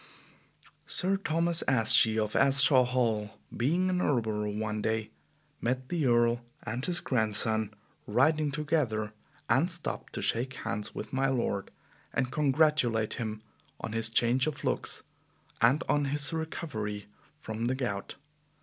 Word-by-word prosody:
Sir 190 Hz, +2 st, 0 dB
Thomas 165 Hz, -2 st, 0 dB
Asshe 110 Hz, -3 st, +5 dB
of 110 Hz, -1 st, -1 dB
Asshawe 135 Hz, -1 st, +6 dB
Hall, 115 Hz, -4 st, -1 dB, 0.2 s
being 170 Hz, +10 st, +1 dB
in 180 Hz, -1 st, +1 dB
Erleboro 110 Hz, -9 st, 0 dB
one 105 Hz, 0 st, -3 dB
day, 110 Hz, 0 st, -1 dB, 0.5 s
met 130 Hz, +2 st, -2 dB
the 165 Hz, -6 st, 0 dB
Earl 120 Hz, 0 st, +3 dB, 0.2 s
and 120 Hz, +3 st, -4 dB
his 175 Hz, +2 st, +1 dB
grandson 110 Hz, -2 st, +1 dB, 0.4 s
riding 150 Hz, +7 st, +2 dB
together, 135 Hz, -8 st, -1 dB, 0.3 s
and 135 Hz, +10 st, +3 dB
stopped 170 Hz, -2 st, -3 dB
to -, -, -4 dB
shake 125 Hz, +3 st, 0 dB
hands 105 Hz, 0 st, -4 dB
with 110 Hz, -, -6 dB
my 135 Hz, +1 st, +2 dB
lord 120 Hz, -6 st, -1 dB, 0.4 s
and 130 Hz, -1 st, 0 dB
congratulate 140 Hz, -6 st, +2 dB
him 110 Hz, -1 st, -4 dB, 0.4 s
on -, -, -5 dB
his 115 Hz, 0 st, +1 dB
change 120 Hz, +4 st, +2 dB
of 150 Hz, -3 st, -4 dB
looks -, -, -2 dB, 0.6 s
and 125 Hz, +6 st, +4 dB
on 145 Hz, -1 st, +2 dB
his 145 Hz, +3 st, 0 dB
recovery 110 Hz, -11 st, -4 dB, 0.3 s
from 110 Hz, +1 st, -5 dB
the 125 Hz, +2 st, 0 dB
gout. 110 Hz, -7 st, -4 dB
125 Hz, 135 wpm, -29 LUFS, 110-150 Hz, 0.6 s, Asshawe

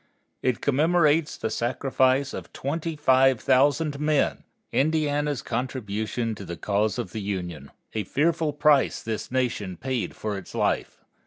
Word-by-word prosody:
It 125 Hz, -3 st, 0 dB
commemorates 155 Hz, +2 st, +3 dB
the 110 Hz, -, -3 dB
sacrifice 130 Hz, +2 st, +1 dB
of -, -, -7 dB
twenty 160 Hz, +4 st, -3 dB
five 135 Hz, -4 st, +4 dB
thousand 140 Hz, +2 st, +2 dB
men 150 Hz, -1 st, +1 dB, 0.3 s
Indiana's 145 Hz, -1 st, +1 dB
contribution 115 Hz, -2 st, -2 dB
to 105 Hz, -, -8 dB
the 85 Hz, -3 st, -6 dB
cause 105 Hz, 0 st, 0 dB
of 90 Hz, -, -4 dB
the 110 Hz, -, -4 dB
Union. 90 Hz, -8 st, -4 dB, 0.2 s
A 110 Hz, -, -1 dB
fearful 155 Hz, -, +1 dB
price 145 Hz, -1 st, +3 dB
this 110 Hz, -1 st, -4 dB
Nation 115 Hz, -8 st, -1 dB
paid 125 Hz, -5 st, -3 dB
for 105 Hz, -2 st, -3 dB
its 95 Hz, -, -12 dB
life. -, -, -1 dB
130 Hz, 140 wpm, -25 LUFS, 110-145 Hz, 0.3 s, five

